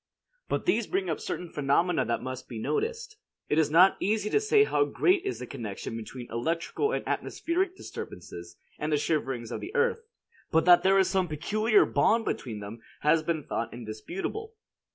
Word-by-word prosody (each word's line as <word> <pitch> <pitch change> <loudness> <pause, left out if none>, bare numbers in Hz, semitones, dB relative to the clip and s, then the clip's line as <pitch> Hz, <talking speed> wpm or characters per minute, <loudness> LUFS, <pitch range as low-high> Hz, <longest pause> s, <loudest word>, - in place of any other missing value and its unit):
But - - -1
these 235 - +2
bring 190 -2 -1
up 155 - -2
certain 180 - -4
phenomena 160 +3 +1
that 120 - -1
must 130 0 -6
be 120 - -6
noticed. 445 - -2 0.3
It 150 - +3
is 155 -2 +3
not 180 +5 +6
easy 210 +1 0
to - - +4
say 430 0 +4
how 425 - +2
great 375 -3 +2
is 390 - -2
the - - -6
connection 115 -5 -6
between 120 +2 -7
electrical 165 - -1
and - - -3
atmospheric 365 +2 -1
disturbances, 85 -1 -9 0.2
and 150 +1 -2
the 150 - +3
shiverings 135 -6 -1
of - - -4
the 380 - -7
earth; 470 -1 +2 0.5
but 160 0 +3
that 175 -1 +8
there 190 +2 +4
is 190 -1 +4
some 190 -1 +1
peculiar 210 +8 +2
bond 225 0 +2
between 110 -5 -3
them 105 +3 -8 0.2
has 155 +2 +4
been 160 -1 -2
thought 115 -3 -3
indisputable. 175 - -6
170 Hz, 180 wpm, -28 LUFS, -, 0.5 s, that